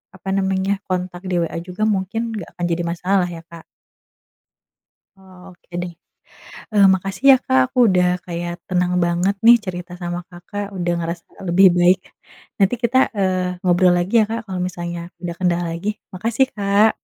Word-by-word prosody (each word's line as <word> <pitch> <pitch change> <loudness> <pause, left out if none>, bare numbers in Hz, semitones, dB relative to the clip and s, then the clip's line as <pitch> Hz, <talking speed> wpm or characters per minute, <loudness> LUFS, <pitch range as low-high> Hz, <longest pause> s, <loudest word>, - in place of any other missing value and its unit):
apa 190 +1 -8
namanya 195 0 0
kontak 180 -1 -3
di 180 - 0
WA 165 - -5
juga 180 +4 -5
mungkin 215 +3 -1
nggak 200 -6 -6
akan 175 - -1
jadi 170 +1 0
masalah 180 +2 0
ya 170 -1 -8
Kak. 170 -1 -11 1.6
Oh, 190 -1 -17 0.2
oke 175 - -27
deh. 175 0 -5 0.8
Eee, 205 -1 +6
makasih 195 +5 -5
ya 265 - +9
Kak 130 - +3
aku - - -6
udah 180 -2 +3 0.2
kayak 175 0 -4 0.2
tenang 180 -1 +1
banget 175 +3 +1
nih 240 +1 +10
cerita 180 -2 -6
sama 175 0 -3
Kakak, 185 +4 -7
udah 175 -1 -1
ngerasa 170 0 -4 0.2
lebih 185 +3 +6
baik. 180 +1 +5 0.6
Nanti 195 +4 +3
kita, 245 +2 +3 0.2
eee, 185 -2 -1
ngobrol 180 0 +4
lagi 175 +4 -1
ya - - +4
Kak, 230 +1 -2
kalau 185 -1 -3
misalnya 175 -1 -5 0.2
ada 175 -1 -3
kendala 175 -1 +1
lagi. 170 +5 -2 0.2
Makasih, 230 +7 +1
Kak. 205 +1 +3
180 Hz, 165 wpm, -20 LUFS, 175-195 Hz, 1.6 s, nih